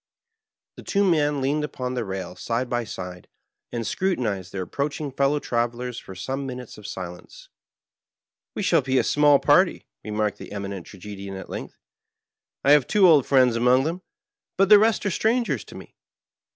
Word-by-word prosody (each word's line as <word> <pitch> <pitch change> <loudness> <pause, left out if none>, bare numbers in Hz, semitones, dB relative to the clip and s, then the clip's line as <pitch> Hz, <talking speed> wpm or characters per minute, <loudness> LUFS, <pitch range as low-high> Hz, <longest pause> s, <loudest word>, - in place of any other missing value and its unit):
The - - -9
two 200 -1 +1
men 150 -4 +2
leaned 145 +3 0
upon 125 -4 -4
the 125 - -2
rail 95 -2 -5
side 120 +5 -2
by 120 -1 -2
side, 90 -3 -8 0.4
and 115 -1 -3
scrutinized 110 - -1
their 95 -1 -3
approaching 140 - -3
fellow 140 +2 +1
travelers 120 -1 -2
for 95 - -11
some 135 +8 -4
minutes 125 -2 -7
in 105 - -13
silence. 95 - -8 1.1
"We - - -2
shall 165 -4 +3
be 130 0 0
a - - +3
small 145 -1 +4
party/' 175 +6 +3 0.2
re - - -8
marked 105 0 -1
the - - -9
Eminent 100 -3 -6
Tragedian 100 0 -8
at 95 - -9
length. - - -7 0.5
" - - -67
I 140 - +6
have 145 -3 +5
two 200 -3 +5
old 150 -6 +5
friends 130 -4 +4
among 125 +2 +4
them, 170 +5 -3 0.6
but 195 0 +3
the 210 -1 +9
rest 220 0 +2
are 205 - +1
strangers 230 +6 0
to - - -13
me. - - -12
130 Hz, 180 wpm, -24 LUFS, 105-150 Hz, 1.1 s, the